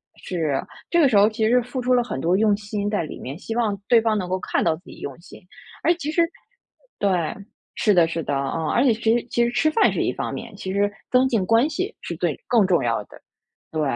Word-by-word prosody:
是， 155 -7 -2 0.3
这 340 - +3
个 290 - +6
时 230 - +1
候 205 +2 +6
其 220 0 0
实 250 +2 +4
付 250 +2 -5
出 250 +1 +1
了 245 -1 +3
很 205 - -5
多 170 +6 +2
用 210 0 +3
心 205 -1 -3
在 205 -5 0
里 155 - -8
面， 135 +5 -7
希 225 +3 -6
望 215 -5 0
对 230 -2 +5
方 220 -2 +1
能 185 -3 -3
够 185 +1 -1
看 - - -1
到 165 -2 +2
自 160 - -17
己 - - -12
用 140 - -6
心。 - - -14 0.4
诶， 340 - +4
其 305 -3 -4
实 335 +1 +3 0.8
对， 180 -6 0 0.4
是 210 - +3
的 170 -2 +5
是 165 -1 -3
的， - - -2
嗯， 140 +4 -2
而 245 - +3
且 265 - +5
其 225 0 +2
实 235 - -5
其 240 - +2
实 240 - -1
吃 310 - +2
饭 435 +8 +3
是 - - -1
一 - - 0
方 - - -4
面， - - -7
其 190 0 -5
实 205 +1 +1 0.2
增 255 +1 +4
进 215 -7 +1
关 230 +7 +3
系 370 +8 -3
是 - - -5
最 - - -1
更 230 -5 +4
重 180 -2 +2
要 115 -3 0
的。 - - -17 0.5
对， 155 -1 -2
210 Hz, 270 characters per minute, -23 LUFS, 175-240 Hz, 0.8 s, 个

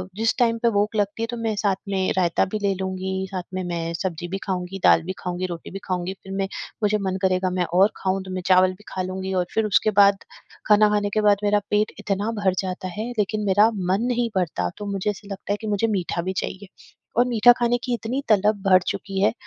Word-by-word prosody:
जिस 225 +1 +1
टाइम 230 -1 +3
पे 235 - +5
भूख 210 +2 0
लगती 205 +2 -1
है, - - -1
तो 240 0 -5
मैं 225 -2 -1
साथ 200 -2 +1
में 190 -1 0
रायता 175 -2 +2
भी 215 - -2
ले 200 -1 +1
लूँगी, 190 0 -3
साथ 185 -2 -3
में 185 0 -2
मैं 170 -1 -3
सब्जी 175 -1 -3
भी 195 +2 -3
खाऊँगी, 190 0 -3
दाल 165 - +6
भी 185 +2 -4
खाऊँगी, 180 0 -3
रोटी 170 -2 -7
भी 195 - -6
खाऊँगी, 185 0 -2
फिर 195 - -10
मैं 195 0 -1 0.4
मुझे 210 +1 +3
मन 190 0 -1
करेगा 185 -1 +1
मैं 180 -1 0
और 195 +4 +5
खाऊँ 190 0 -1
तो 190 - -9
मैं 185 0 -3
चावल 185 0 +5
भी 205 +3 -17
खा 185 - -3
लूँगी 190 +1 -4
और - - -2
फिर 220 -1 +1
उसके 215 +1 +2
बाद 200 0 +5 0.4
खाना 210 0 +6
खाने 205 -1 +1
के 215 - +2
बाद 205 -1 +4
मेरा 205 0 +3
पेट 210 +1 +1
इतना 205 +3 -1
भर 190 -2 +2
जाता 185 -1 -3
है, 215 +6 -5
लेकिन 210 +1 0
मेरा 205 +3 +5
मन 190 +2 0
नहीं 240 -1 0
भरता 150 - -1
तो 205 - -6
मुझे 195 +1 -1
ऐसा 200 +1 -12
लगता 195 +1 -3
है - - -2
कि 220 - -5
मुझे 210 +2 +1
मीठा 180 -4 -1
भी 190 +2 -3
चाहिए 190 +1 -6 0.5
और 245 - +5
मीठा 240 0 +6
खाने 240 0 +2
की 245 - -1
इतनी 240 +4 -2
तलब 205 0 +3
भर 185 -1 +7
चुकी 195 -1 -3
है 210 - +3
195 Hz, 240 wpm, -23 LUFS, 185-210 Hz, 0.5 s, भर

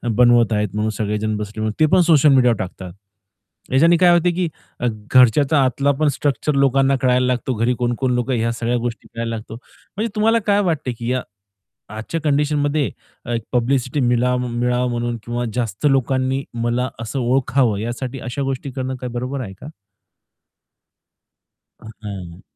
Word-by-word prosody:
बनवत 120 -1 +4
आहेत 105 -1 0
म्हणून 105 +1 0
सगळेजण 105 0 -1
बसले 105 +1 -3
ते 155 - +6
पण 185 - +6
सोशल 155 -4 +5
मीडिया 125 -2 +5
वर 115 - -1
टाकतात. 90 -1 -6 0.8
याच्याने 165 +6 +5
काय 180 0 +5
होत 175 0 +3
की 180 -1 0 0.6
घरच्याचा 135 +3 +5
आतला 140 +2 +1
पण 155 - +3
स्ट्रक्चर 145 +1 -1
लोकांना 135 0 +3
कळायला 125 0 +3
लागतो, 125 +1 -1
घरी 115 +3 +1
कोण-कोण 120 +2 -1
लोकं 125 +2 -1
ह्या 115 0 0
सगळ्या 120 +1 -1
गोष्टी 120 -1 -5
मिळायला 115 0 -3
लागतो. 110 0 -8
म्हणजे 205 - -7
तुम्हाला 225 +2 +3
काय 205 0 +4
वाटते 160 -8 -1
की 115 +1 -4
या 130 0 0 0.8
आजच्या 115 +10 -4
कंडिशनमध्ये 145 0 +1 0.6
पब्लिसिटी 130 +2 0
मिलाव 125 0 +2
मिळावा 125 +1 0
म्हणून 120 0 -2
किंवा 120 +1 -3
जास्त 115 0 -2
लोकांनी 130 0 0 0.2
मला 120 +2 0
असं 115 +4 -4
ओळखावं 125 -3 +1
यासाठी 120 +4 -4
अशा 125 +4 -4
गोष्टी 135 0 -3
करणं 130 0 -3 0.2
बरोबर 125 +3 -3
आहे 100 -5 -7
का? - - -10 2.1
अ, - - -18 0.2
हं. 95 -5 -8
125 Hz, 150 wpm, -20 LUFS, 115-140 Hz, 2.1 s, ते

